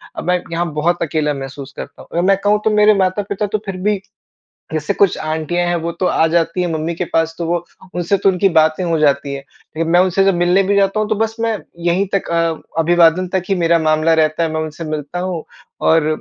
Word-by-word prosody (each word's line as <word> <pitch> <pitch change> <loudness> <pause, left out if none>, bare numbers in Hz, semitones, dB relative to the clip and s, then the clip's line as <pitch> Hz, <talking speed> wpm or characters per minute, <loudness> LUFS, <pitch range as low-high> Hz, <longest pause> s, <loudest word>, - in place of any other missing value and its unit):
अब - - -6
मैं 180 0 +2
यहाँ 170 0 -2
बहुत 170 +4 0
अकेला 150 -1 0
महसूस 135 0 -8
करता - - -8
हूँ। - - -15
अगर 170 - +1
मैं 195 0 +4
कहूँ 205 +1 +3
तो - - +4
मेरे 210 0 +6
माता-पिता 200 +2 -1
तो 210 - -1
फिर 195 -2 -5
भी 210 -2 +1 0.7
जैसे 155 +5 -1
कुछ 195 -3 +3
आंटियाँ 160 +3 -2
है 175 - +1
वो 165 +1 -3
तो 175 +2 -2
आ 160 - +3
जाती 165 +2 0
है - - 0
मम्मी 160 +2 -2
के 180 - -2
पास 165 0 +1
तो 170 - -2
वो 170 0 -1 0.3
उनसे 175 +3 +1
तो 195 - +2
उनकी 190 +1 +3
बातें 160 0 +2
हो 165 -2 0
जाती 140 -2 +1
हैं। 140 +3 -7
मैं 170 +2 +3
उनसे 195 +1 +3
मिलने 175 +2 +3
भी 200 +1 +1
जाता 200 +1 +2
हूँ 215 - -1
तो 215 - +1
बस 220 +1 -1
मैं 225 -1 0 0.3
यहीं 185 +4 +1
तक 195 - -1
अ 165 -1 -2
अभिवादन 175 +2 +3
तक 190 - +1
ही 195 - +2
मेरा 170 -2 +2
मामला 155 0 +2
रहता 155 +1 +1
है 165 - 0
मैं 160 - -1
उनसे 155 +1 -6
मिलता 155 +1 -4
हूँ 180 -3 -3 0.4
और 160 -1 +4
170 Hz, 230 wpm, -17 LUFS, 160-190 Hz, 0.7 s, मेरे